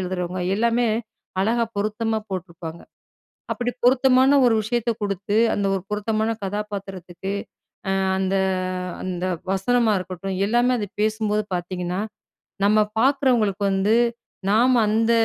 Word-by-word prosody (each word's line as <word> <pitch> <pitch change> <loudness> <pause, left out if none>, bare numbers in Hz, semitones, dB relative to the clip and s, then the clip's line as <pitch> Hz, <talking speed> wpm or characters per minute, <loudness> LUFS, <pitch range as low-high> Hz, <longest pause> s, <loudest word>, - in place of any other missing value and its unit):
எழுதுறவுங்க 180 0 -3
எல்லாமே, 235 +2 +2 0.5
அழகா 230 +3 +2
பொருத்தமா 215 +2 0
போட்டுருப்பாங்க. 170 -3 -6 0.7
அப்பிடி 245 0 -2
பொருத்தமான 260 +2 +5
ஒரு 230 - +4
விஷயத்த 235 +1 -1
குடுத்து, 200 +1 -1 0.2
அந்த 200 - 0
ஒரு 190 - -2
பொருத்தமான 215 +1 0
கதாபாத்திரத்துக்கு, 195 -2 -5 0.6
அ - - +2 0.3
அந்த 190 0 0 0.7
அந்த 185 -1 -3 0.3
வசனமா 225 +3 +2
இருக்கட்டும், 185 +1 -5
எல்லாமே 240 +2 +3
அத 205 - -3
பேசும்போது 215 -1 0
பாத்தீங்கன்னா, 180 +1 -3 0.7
நம்ம 215 +1 +4 0.2
பாக்குறவங்களுக்கு 250 -8 +2
வந்து, 195 +3 +2 0.6
நாம 245 +3 +4
அந்த 225 +2 +2
210 Hz, 110 wpm, -23 LUFS, 190-235 Hz, 0.7 s, பொருத்தமான